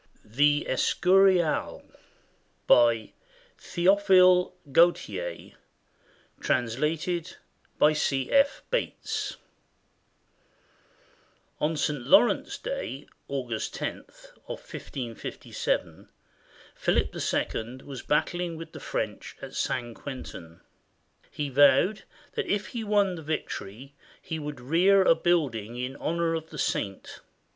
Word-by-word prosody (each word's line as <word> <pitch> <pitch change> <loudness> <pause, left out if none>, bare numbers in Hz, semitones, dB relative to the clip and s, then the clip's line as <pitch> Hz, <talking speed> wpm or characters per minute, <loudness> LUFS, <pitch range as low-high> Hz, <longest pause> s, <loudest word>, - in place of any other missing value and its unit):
" - - -31 0.2
THE 145 0 +4
ESCURIAL 185 +4 +2 0.8
BY 115 -2 +4 0.5
THEOPHILE 185 0 +4 0.2
GAUTIER, 175 - +1 0.9
TRANSLATED 150 +8 -1 0.4
BY 150 - +5
C. 135 -3 -1
F. 280 0 +3
BATES 445 -3 -2 2.2
[On 155 +1 0
St. 150 -2 -1
Laurence's 140 - +3
Day, - - -5 0.2
August - - -4
lo, - - -4 0.4
of - - -5
1557, 120 -5 -4 0.6
Philip - - 0 0.4
II 115 +3 -5
was 135 -3 -7
battling 170 +3 -1
with 165 - -9
the - - -9
French - - -4
at - - -9
St. 120 -2 -2
Quentin. 85 -11 -9 0.7
He 145 -1 -4
vowed 145 +9 +4 0.3
that 450 -4 -2
if 205 -8 -1
he 235 -2 -4
won 205 -3 +2
the 165 - -7
victory, 140 -5 -5 0.3
he 160 - -5
would 150 -3 -6
rear 180 +9 +4
a 175 - +6
building 145 -10 0
in 125 +2 -4
honor 170 0 -1
of 160 0 -4
the 155 - -10
saint. 100 -7 -3
160 Hz, 100 wpm, -27 LUFS, 130-185 Hz, 2.2 s, a